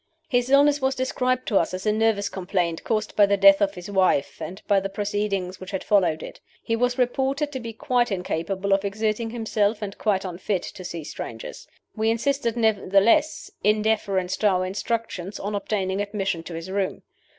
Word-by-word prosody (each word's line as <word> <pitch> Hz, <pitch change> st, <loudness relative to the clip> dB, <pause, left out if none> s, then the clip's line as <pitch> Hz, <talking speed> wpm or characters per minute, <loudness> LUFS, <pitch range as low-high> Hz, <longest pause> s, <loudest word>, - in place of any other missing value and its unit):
"His 245 Hz, -4 st, +1 dB
illness 285 Hz, +1 st, +5 dB
was 265 Hz, 0 st, +1 dB
described 255 Hz, 0 st, -1 dB
to 200 Hz, -, +4 dB
us 170 Hz, -, -1 dB
as 185 Hz, -, -7 dB
a 210 Hz, -, +3 dB
nervous 215 Hz, -2 st, +1 dB
complaint, 180 Hz, -3 st, -2 dB
caused 215 Hz, -1 st, -1 dB
by 205 Hz, -1 st, +6 dB
the 200 Hz, 0 st, +2 dB
death 195 Hz, +1 st, +7 dB
of 200 Hz, 0 st, +1 dB
his 180 Hz, 0 st, -8 dB
wife, 190 Hz, -7 st, +1 dB
and 190 Hz, +3 st, -6 dB
by 200 Hz, -1 st, +4 dB
the 195 Hz, 0 st, -4 dB
proceedings 200 Hz, -2 st, -2 dB
which 185 Hz, -, -8 dB
had 190 Hz, -2 st, -3 dB
followed 180 Hz, -6 st, +2 dB
it. -, -, -10 dB, 0.2 s
He 230 Hz, -, 0 dB
was 245 Hz, +2 st, 0 dB
reported 270 Hz, +4 st, 0 dB
to 265 Hz, -, -4 dB
be 230 Hz, -2 st, -6 dB
quite 240 Hz, +1 st, 0 dB
incapable 190 Hz, +1 st, -1 dB
of 195 Hz, 0 st, +2 dB
exerting 215 Hz, +3 st, -1 dB
himself, 220 Hz, -2 st, 0 dB
and 205 Hz, -2 st, -5 dB
quite 195 Hz, -3 st, +1 dB
unfit 185 Hz, +1 st, -2 dB
to 185 Hz, -, -8 dB
see 170 Hz, -2 st, -6 dB
strangers. -, -, -8 dB, 0.3 s
We 220 Hz, 0 st, +1 dB
insisted 240 Hz, 0 st, 0 dB
nevertheless 220 Hz, +6 st, +2 dB
(in 210 Hz, +1 st, +3 dB
deference 195 Hz, -4 st, 0 dB
to 215 Hz, -, +2 dB
our 185 Hz, -2 st, +2 dB
instructions) 200 Hz, -1 st, -3 dB
on 205 Hz, +2 st, -4 dB
obtaining 200 Hz, -1 st, -1 dB
admission 195 Hz, -4 st, -2 dB
to 170 Hz, -, -7 dB
his 165 Hz, +3 st, -6 dB
room. 195 Hz, -1 st, -2 dB
205 Hz, 190 wpm, -24 LUFS, 190-230 Hz, 0.3 s, death